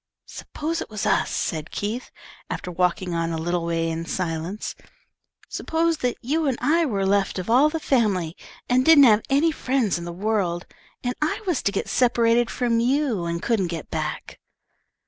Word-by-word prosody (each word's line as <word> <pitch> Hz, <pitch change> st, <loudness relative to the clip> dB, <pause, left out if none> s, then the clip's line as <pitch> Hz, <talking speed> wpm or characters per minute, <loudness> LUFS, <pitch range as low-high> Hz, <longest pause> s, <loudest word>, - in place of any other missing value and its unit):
"S'pose 325 Hz, +2 st, -4 dB
it -, -, -6 dB
was 215 Hz, -2 st, -4 dB
us," -, -, +2 dB
said 155 Hz, -1 st, -2 dB
Keith, 220 Hz, +5 st, -4 dB, 0.4 s
after 180 Hz, -, -4 dB
walking 180 Hz, 0 st, 0 dB
on 165 Hz, 0 st, -1 dB
a 165 Hz, -, -2 dB
little 170 Hz, +1 st, -1 dB
way 165 Hz, 0 st, -1 dB
in 165 Hz, 0 st, -3 dB
silence. 170 Hz, +3 st, -3 dB, 0.7 s
"S'pose 330 Hz, 0 st, 0 dB
that 250 Hz, -1 st, -1 dB
you 305 Hz, +5 st, 0 dB
and 260 Hz, -3 st, 0 dB
I 330 Hz, +1 st, +2 dB
were 200 Hz, -6 st, -1 dB
left 195 Hz, 0 st, +1 dB
of 185 Hz, +4 st, -3 dB
all 270 Hz, +6 st, +6 dB
the 325 Hz, +1 st, -3 dB
family, 200 Hz, -, +1 dB, 0.3 s
and 250 Hz, +1 st, +3 dB
didn't 315 Hz, -1 st, +8 dB
have 220 Hz, -4 st, +6 dB
any 290 Hz, +4 st, +3 dB
friends 255 Hz, -, 0 dB
in 170 Hz, -, -7 dB
the 175 Hz, -, -5 dB
world, 185 Hz, -2 st, -1 dB, 0.4 s
and 245 Hz, 0 st, -1 dB
I 305 Hz, +7 st, -1 dB
was 355 Hz, -8 st, 0 dB
to 200 Hz, -, +1 dB
get 200 Hz, -, -2 dB
separated 235 Hz, -1 st, +3 dB
from 235 Hz, -2 st, 0 dB
you 245 Hz, -, +1 dB
and 170 Hz, +1 st, -3 dB
couldn't 215 Hz, -6 st, +1 dB
get 165 Hz, -2 st, -6 dB
back?" -, -, -4 dB
215 Hz, 180 wpm, -24 LUFS, 175-265 Hz, 0.7 s, didn't